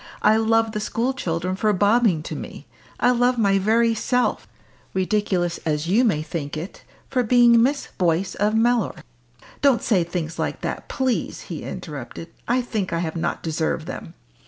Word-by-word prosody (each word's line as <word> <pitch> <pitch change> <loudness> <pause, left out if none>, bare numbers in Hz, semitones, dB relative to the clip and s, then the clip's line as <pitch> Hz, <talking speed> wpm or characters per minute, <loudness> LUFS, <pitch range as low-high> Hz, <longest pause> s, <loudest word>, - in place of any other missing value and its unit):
I 215 +1 +5
love 225 0 +2
the 210 - -3
school 230 +4 -1
children 180 -5 -2
for 215 +2 +1
bobbing 205 -4 +3
to - - -5
me. - - -8 0.3
I 245 - +4
love 245 0 +2
my 200 -3 +3
very 230 +3 +3
self 250 +3 0 0.5
ridiculous 190 -3 0
as 150 -1 -2
you 205 +9 +3
may 185 -11 +1
think 155 -2 -5
it 170 +5 -7 0.3
for 255 -2 +2
being 240 0 +5
Miss 275 +4 0
Boyce 175 +1 +1
of 210 +2 0
Mellor!" 235 -1 +2 0.7
"Don't 275 -4 +3
say 190 -7 +2
things 165 -1 -4
like - - -2
that, - - -4
please!" 260 -4 -1
he 165 -5 -7
interrupted; 155 -2 -7 0.2
"I 250 +1 +2
think 215 -7 -3
I 170 - 0
have 165 -1 -3
not 165 - -2
deserved 160 0 -1
them." 165 0 -8
205 Hz, 170 wpm, -23 LUFS, 170-235 Hz, 0.7 s, I